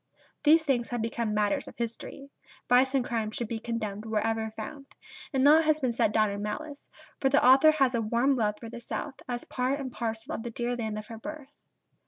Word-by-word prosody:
These 315 +1 +6
things 255 -6 0
have 240 -2 -3
become 230 -1 -2
matters 210 -1 0
of - - -11
history: 235 +4 -6 0.4
vice 260 +2 +4
and 260 -2 +2
crime 225 -3 -1
should 225 +1 -4
be 225 0 -4
condemned 220 -3 -4
wherever 220 0 -1
found; 275 +5 -7 0.4
and 265 -3 +1
naught 310 +3 +6
has 310 0 +3
been 255 -5 0
set 220 - +2
down 215 -1 +2
in 200 0 -4
malice; 285 +8 -6 0.3
for 270 - +2
the 275 -1 +3
author 270 +4 +8
has 275 -5 +3
a 235 - +1
warm 235 +5 +2
love 210 -4 0
for 230 - -8
the 235 +1 -8
South 270 +3 -5
as 240 -1 -3
part 260 +3 -1
and 265 -2 -5
parcel 230 +5 -4
of - - -3
the 235 - -5
dear 240 +1 -2
land 220 -3 -3
of 215 - -6
her 225 0 -9
birth. 300 +1 -8
240 Hz, 220 wpm, -28 LUFS, 220-275 Hz, 0.4 s, author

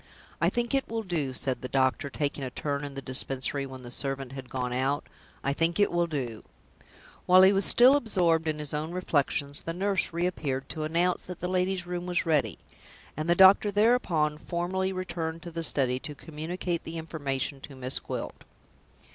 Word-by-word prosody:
"I - - +4
think 240 +1 -2
it 270 -1 +1
will 225 0 -3
do," 165 -8 -2
said 130 0 -3
the 130 - -4
doctor, 130 +1 +1
taking 145 0 -3
a 130 - -3
turn 140 +2 -3
in 140 -1 -6
the 135 - -6
Dispensary 135 +1 -1
when 130 -1 -10
the 120 - -9
servant 135 0 -3
had 135 -2 -8
gone 125 -1 -3
out 135 +3 0 0.4
"I 140 - +1
think 165 +5 0
it 205 - +4
will 175 0 +1
do." 125 -8 -4 0.8
While 185 +1 +8
he 190 +1 +7
was 195 0 +2
still 255 +3 +8
absorbed 175 - +1
in 155 -1 0
his 150 -1 -5
own 155 +3 -3
reflections, 145 -4 0
the 165 - -4
nurse 195 +1 +1
re 170 +1 -1
appeared 135 -7 -3
to 155 -2 -3
announce 175 +3 +1
that 180 -1 -8
the 180 - -3
lady's 185 0 0
room 175 0 -4
was 180 -1 +1
ready; 145 - +1 0.6
and 155 +3 -3
the 175 - +5
doctor 190 +3 +7
thereupon 195 -9 +2
formally 185 +3 -2
returned 170 -3 -4
to 170 - -7
the 165 0 -4
study 130 -5 +1
to 150 +2 -6
communicate 165 +3 -4
the 165 +1 -6
information 140 -4 -3
to 140 - -10
Miss 130 0 +1
Gwilt. - - -6
160 Hz, 195 wpm, -28 LUFS, 135-180 Hz, 0.8 s, While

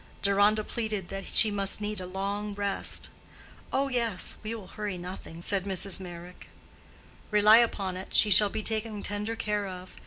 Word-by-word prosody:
Deronda 205 +2 +3
pleaded 215 -5 -4
that 195 0 -6
she 220 - +4
must 200 -1 +2
need 210 -1 -4
a 180 - -6
long 200 +2 -4
rest. 200 -1 -1 0.6
"Oh, 275 +1 +1
yes; 235 -7 0
we 220 +1 -4
will 215 -4 -9
hurry 210 -3 -5
nothing," 175 -2 -8
said 195 -1 +1
Mrs. 195 -1 -2
Meyrick. 175 -1 -10 0.8
"Rely 210 +1 +6
upon 200 -5 +1
it, 185 +1 -8
she 210 - +6
shall 205 +2 +8
be 215 - -4
taken 220 -1 -2
tender 210 +2 -3
care 210 -2 -2
of. 185 0 -9
205 Hz, 165 wpm, -28 LUFS, 190-215 Hz, 0.8 s, shall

